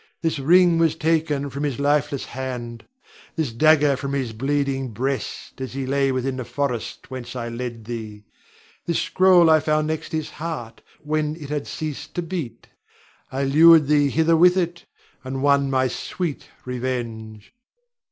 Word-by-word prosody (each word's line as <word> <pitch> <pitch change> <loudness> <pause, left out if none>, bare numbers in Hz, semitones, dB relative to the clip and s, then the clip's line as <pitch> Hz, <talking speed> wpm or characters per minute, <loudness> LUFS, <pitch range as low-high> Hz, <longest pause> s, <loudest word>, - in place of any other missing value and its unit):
This 160 -3 0
ring 170 +4 +5
was 165 -2 +3
taken 155 -3 0
from 140 - -5
his 140 -4 -2
lifeless 145 -1 +1
hand; 120 -2 -6 0.5
this 155 -7 -1
dagger 150 +2 +4
from 140 +1 -4
his 130 -5 -2
bleeding 135 +1 -1
breast, 130 +3 -4
as 130 - -5
he 135 0 -3
lay 135 0 +1
within 130 0 -2
the 125 - -3
forest 130 -1 -4
whence 130 -1 -7
I 120 -1 -4
led 115 -1 -6
thee. 110 -3 -7 0.6
This 170 - +1
scroll 185 -2 +5
I 160 -1 +6
found 155 0 +1
next 155 0 -4
his 155 -1 -3
heart 145 -8 -6 0.2
when 155 0 -1
it 150 -4 -9
had 145 -1 -3
ceased 155 0 -6
to 175 - -1
beat. 165 -7 -5 0.7
I 135 +1 -2
lured 155 +3 +7
thee 145 0 +3
hither 160 +3 +3
with 180 +3 +5
it, 170 -2 -2 0.4
and 130 +1 -4
won 140 -1 +3
my 130 -1 +2
sweet 165 +3 -4 0.2
revenge. 115 - -5
140 Hz, 160 wpm, -23 LUFS, 130-155 Hz, 0.7 s, lured